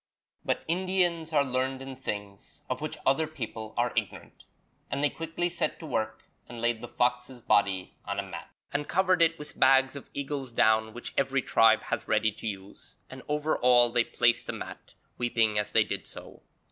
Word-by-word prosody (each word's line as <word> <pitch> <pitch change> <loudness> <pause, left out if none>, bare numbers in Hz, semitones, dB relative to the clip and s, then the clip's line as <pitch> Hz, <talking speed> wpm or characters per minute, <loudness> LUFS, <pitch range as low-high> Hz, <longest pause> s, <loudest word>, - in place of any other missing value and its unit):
But - - -1
Indians 175 -2 +1
are 145 -2 +3
learned 130 0 -1
in 135 0 -7
things 100 -4 -7
of 130 - -2
which 155 - -4
other 155 +4 +3
people 115 -7 -7
are 120 0 +1
ignorant, - - -4 0.4
and 140 - -2
they 145 - +3
quickly 165 +2 -2
set 175 0 -2
to 165 - -10
work 110 -5 -2 0.3
and 120 0 -8
laid 120 -1 0
the 120 - -6
fox's 125 +1 -1
body 95 -4 +1
on - - -4
a - - -1
mat, - - -8 0.2
and 145 0 -1
covered 185 -1 +2
it 165 0 +4
with 150 0 -9
bags 135 +1 +5
of 140 - -9
eagle's 140 -2 -3
down 110 -1 +2
which 120 - -6
every 135 -1 +1
tribe 110 -1 +4
has - - -3
ready 110 0 +2
to 110 - -8
use, 100 -1 -8 0.2
and 130 0 -9
over 150 +1 0
all 120 -1 +6
they 120 0 +3
placed 120 0 +1
a - - -1
mat, - - -9 0.2
weeping 115 -3 +2
as 105 0 -1
they - - +5
did - - -5
so. - - -11
125 Hz, 190 wpm, -28 LUFS, 115-150 Hz, 0.4 s, all